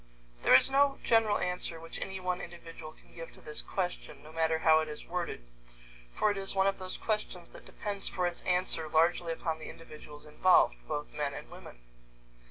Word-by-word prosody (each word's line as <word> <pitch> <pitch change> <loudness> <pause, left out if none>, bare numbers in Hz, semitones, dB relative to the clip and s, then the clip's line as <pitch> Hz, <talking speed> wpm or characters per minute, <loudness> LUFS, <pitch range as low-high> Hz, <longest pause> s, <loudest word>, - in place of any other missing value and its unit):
There - - +7
is 130 - +7
no 275 0 +3
general 225 -3 +4
answer 180 -2 -3
which 165 0 -8
any 190 0 -3
one 180 -1 -2
individual 165 -2 -9
can - - -22
give 165 -1 -8
to - - -16
this 150 - -5
question, 180 -2 -4
no 155 - -12
matter 160 0 +2
how 160 0 +5
it 155 - -1
is 150 - -8
worded, 170 - -4 0.7
for 215 - +3
it 205 - -3
is 195 0 -4
one 190 0 +4
of 195 0 +1
those 185 0 -5
questions 210 -5 -3
that - - -13
depends 200 -2 -4
for 180 - -1
its 175 -1 -2
answer 180 -3 0
largely 165 +2 +3
upon 160 -1 -2
the - - -8
individuals 150 -2 -11
involved, 155 +5 +4
both 150 -1 -4
men 145 -2 -2
and - - -9
women. - - -12
170 Hz, 195 wpm, -31 LUFS, 160-190 Hz, 0.7 s, There